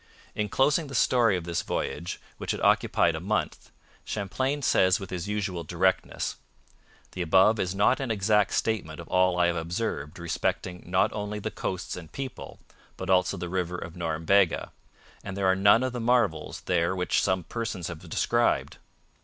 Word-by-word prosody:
In 105 -1 -2
closing 145 - +2
the 135 - -7
story 115 -6 +3
of 90 - -5
this 85 0 -2
voyage, 90 +1 -3 0.2
which - - -2
had - - -5
occupied - - +3
a - - -4
month, - - -2 0.3
Champlain 130 +8 -2
says 95 -6 +4
with 95 -2 -8
his 90 0 -4
usual 100 -4 -2
directness: 90 +4 0 0.7
'The 90 - -5
above 95 +6 +4
is 90 0 -1
an 125 +6 +2
exact 105 -1 +2
statement 95 -9 -1
of 85 - -9
all 90 -1 +3
I 90 - +4
have 85 0 +1
observed 85 -3 -3
respecting 90 +1 -2
not 90 +1 +2
only 105 0 -4
the 105 - -4
coasts 95 - -4
and 80 -3 -10
people, 135 -1 -7 0.4
but 95 0 -3
also 90 -1 +3
the 90 +1 -4
river 90 0 -2
of 85 -1 -7
Norumbega; 85 +2 +1 0.5
and 100 -1 -6
there 100 - 0
are 95 0 +4
none 100 +5 +5
of 130 -1 -2
the 125 - -3
marvels 115 -10 +1
there 85 0 +1
which 90 -1 +1
some 95 -2 0
persons 110 -4 -4
have 85 -3 -6
described. 120 +7 +1
95 Hz, 170 wpm, -27 LUFS, 85-105 Hz, 0.7 s, none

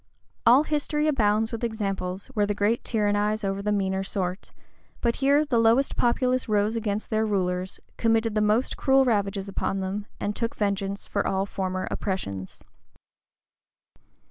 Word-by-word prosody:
All 255 +5 +7
history 300 0 0
abounds 220 -6 +2
with 230 0 -5
examples 195 -4 -2
where 205 -3 +1
the 205 - -1
great 210 +3 +1
tyrannize 210 -1 0
over 195 0 -1
the 210 +1 -1
meaner 190 -1 0
sort; 185 -1 -3 0.5
but 235 -1 0
here 285 +2 +3
the 250 -6 +1
lowest 230 +4 +3
populace 250 0 +1
rose 210 +1 +2
against 215 -1 -3
their 220 0 +2
rulers, 185 -3 -1 0.2
committed 225 -1 +2
the 215 - +1
most 215 +4 +1
cruel 270 0 +4
ravages 200 -4 0
upon 195 0 -2
them, 195 +2 -3
and 205 0 -2
took 230 -1 -2
vengeance 200 -1 -2
for 200 - -1
all 195 0 0
former 185 -2 -3
oppressions. 100 - -4
210 Hz, 150 wpm, -26 LUFS, 195-230 Hz, 0.5 s, All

